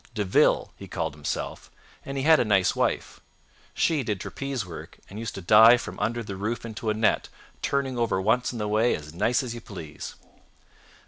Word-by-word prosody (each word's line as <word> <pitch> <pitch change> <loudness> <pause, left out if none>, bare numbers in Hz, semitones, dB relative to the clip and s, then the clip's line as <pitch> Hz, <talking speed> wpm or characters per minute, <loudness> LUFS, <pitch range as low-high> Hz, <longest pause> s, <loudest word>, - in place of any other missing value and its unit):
De 105 - 0
Ville, 95 - +3
he - - -10
called 80 -2 -3
himself, 75 -1 -5 0.3
and 140 0 -5
he 135 - -1
had 160 +1 +6
a - - +4
nice 95 -5 +2
wife. - - -1 0.6
She 160 -4 +2
did 105 -6 -2
trapeze 135 +1 -4
work 85 -2 -10
and 100 - -9
used 115 -1 -5
to 95 - -6
dive 110 +6 +7
from - - -8
under 115 +3 -1
the 100 -2 -6
roof 110 +5 -3
into 110 0 -4
a 105 - +1
net, 110 0 +1 0.3
turning 135 -3 -1
over 115 -5 +1
once 110 +6 +1
on 120 - -6
the 105 -1 -2
way 110 +3 +2
as 75 0 -9
nice 115 - +1
as 120 -2 -5
you 120 - -8
please. 85 -9 -8
110 Hz, 200 wpm, -26 LUFS, 100-120 Hz, 0.6 s, dive